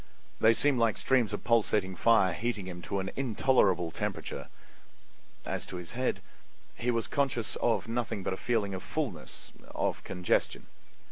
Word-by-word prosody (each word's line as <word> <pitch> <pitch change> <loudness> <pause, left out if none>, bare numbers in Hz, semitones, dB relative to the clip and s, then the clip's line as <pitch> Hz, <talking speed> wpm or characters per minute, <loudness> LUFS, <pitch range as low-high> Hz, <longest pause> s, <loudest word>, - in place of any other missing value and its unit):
They 110 - +6
seemed 140 +1 +2
like 115 -3 +2
streams 125 -5 +2
of 105 - -4
pulsating 105 -5 +2
fire 95 -2 +4
heating 110 -1 -2
him 90 -1 -7
to 100 - 0
an 95 - -4
intolerable 105 -9 +2
temperature. - - -4 1.0
As - - -3
to - - -6
his 90 -2 -6
head, 130 +1 -1 0.5
he 120 - -2
was 115 -1 +1
conscious 130 -6 -1
of 115 -1 +1
nothing 115 -4 -2
but 95 - -1
a - - -4
feeling 105 -4 0
of 95 - -4
fullness—of 125 - -4
congestion. 90 -1 0
110 Hz, 150 wpm, -30 LUFS, 95-120 Hz, 1.0 s, They